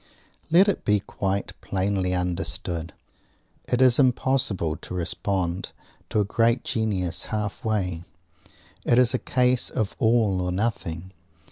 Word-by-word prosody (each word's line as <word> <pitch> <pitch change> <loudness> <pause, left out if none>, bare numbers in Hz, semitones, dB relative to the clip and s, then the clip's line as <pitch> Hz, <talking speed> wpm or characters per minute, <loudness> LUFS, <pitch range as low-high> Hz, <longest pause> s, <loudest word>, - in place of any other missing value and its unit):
Let 180 +5 +6
it 200 - 0
be 105 -1 +3
quite 100 0 -3
plainly 95 -1 0
understood. 90 -1 -2 0.8
It 125 +1 +4
is 125 0 +5
impossible 125 - +2
to 90 - -8
respond 90 0 -2 0.4
to - - +1
a 105 - +2
great 115 +3 +2
genius 100 -6 -1
halfway. 105 -4 -2 0.8
It 120 - +3
is 125 -1 +4
a 130 - +1
case 125 -1 +1
of 105 -3 -2
all 110 -5 +3
or 90 0 -1
nothing. 95 -4 -3
100 Hz, 125 wpm, -25 LUFS, 90-120 Hz, 0.8 s, Let